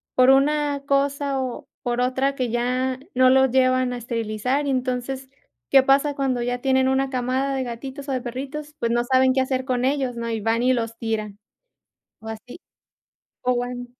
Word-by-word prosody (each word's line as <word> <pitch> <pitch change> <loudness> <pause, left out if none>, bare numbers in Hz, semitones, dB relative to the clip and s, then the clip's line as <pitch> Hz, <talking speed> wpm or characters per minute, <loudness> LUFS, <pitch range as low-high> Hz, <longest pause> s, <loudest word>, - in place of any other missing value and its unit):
por 255 0 +5
una 285 +1 +2
cosa 280 0 0
o 255 -2 -5
por 245 0 -1
otra, 265 +2 0
que 255 -3 -1
ya 250 +2 -1 0.2
no 255 0 +5
los 265 0 +4
llevan 255 -1 +2
a - - -4
esterilizar, 235 +4 -2
y - - 0
entonces, 260 +1 -2 0.4
¿qué 270 - +8
pasa 275 +2 +3
cuando 270 -3 -1
ya 245 +1 -2
tienen 265 0 +2
una 265 0 +1
camada 260 +2 -1
de 265 - -1
gatitos 265 +4 -7
o - - 0
de 255 -1 -1
perritos? 280 +5 -6
Pues, 235 - 0
no 240 0 +2
saben 260 +1 +4
qué 265 - +1
hacer 260 0 -1
con 255 -1 -1
ellos, 265 -3 0
¿no?, 235 0 -3
y 225 -1 -2
van 225 +2 +1
y 255 +1 +3
los 230 -2 -3
tiran, 215 -3 -3 0.8
o 220 - -8
así 220 +7 -9 0.8
o, 250 0 +1
bueno 245 0 -4
255 Hz, 190 wpm, -23 LUFS, 245-270 Hz, 0.8 s, qué